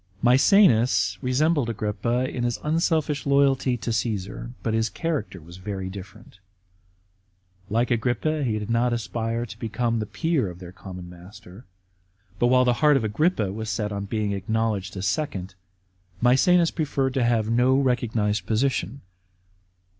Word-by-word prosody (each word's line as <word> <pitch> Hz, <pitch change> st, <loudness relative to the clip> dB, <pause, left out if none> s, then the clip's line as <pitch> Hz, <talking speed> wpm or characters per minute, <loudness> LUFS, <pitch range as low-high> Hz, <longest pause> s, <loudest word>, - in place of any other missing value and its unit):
Maecenas 125 Hz, -, +4 dB
resembled 145 Hz, +1 st, +1 dB
Agrippa 115 Hz, +3 st, -1 dB
in 125 Hz, -1 st, -4 dB
his 120 Hz, -1 st, 0 dB
unselfish 155 Hz, -2 st, 0 dB
loyalty 135 Hz, -2 st, +3 dB
to 115 Hz, 0 st, -3 dB
Caesar; 105 Hz, -1 st, -3 dB
but 110 Hz, -, -1 dB
his 110 Hz, 0 st, +1 dB
character 160 Hz, -, -3 dB
was 85 Hz, +3 st, -13 dB
very 95 Hz, 0 st, -5 dB
different. 100 Hz, +1 st, -12 dB, 1.3 s
Like 120 Hz, +4 st, 0 dB
Agrippa, 125 Hz, +6 st, 0 dB
he 110 Hz, -5 st, 0 dB
did 105 Hz, +1 st, -4 dB
not 120 Hz, +1 st, +2 dB
aspire 115 Hz, +1 st, -2 dB
to 110 Hz, -1 st, -11 dB
become 115 Hz, +1 st, -1 dB
the 105 Hz, -, -3 dB
peer 160 Hz, -, 0 dB
of 90 Hz, -, -10 dB
their 90 Hz, -1 st, -10 dB
common 95 Hz, -1 st, -9 dB
master; 95 Hz, +5 st, -13 dB, 0.7 s
but 120 Hz, -, +3 dB
while 125 Hz, +1 st, +4 dB
the 125 Hz, -, +3 dB
heart 150 Hz, -2 st, +5 dB
of 125 Hz, -, -1 dB
Agrippa 110 Hz, -, 0 dB
was 110 Hz, +1 st, -5 dB
set 105 Hz, -2 st, -2 dB
on 100 Hz, 0 st, -4 dB
being 105 Hz, 0 st, -2 dB
acknowledged 100 Hz, -1 st, -2 dB
as 95 Hz, -, -3 dB
second, 95 Hz, -4 st, -2 dB, 0.7 s
Msecenas 165 Hz, +8 st, +4 dB
preferred 135 Hz, -4 st, -1 dB
to 130 Hz, -2 st, +1 dB
have 115 Hz, -2 st, +1 dB
no 125 Hz, +3 st, +3 dB
recognised 115 Hz, -6 st, 0 dB
position. 120 Hz, 0 st, -1 dB
115 Hz, 145 wpm, -24 LUFS, 105-130 Hz, 1.3 s, heart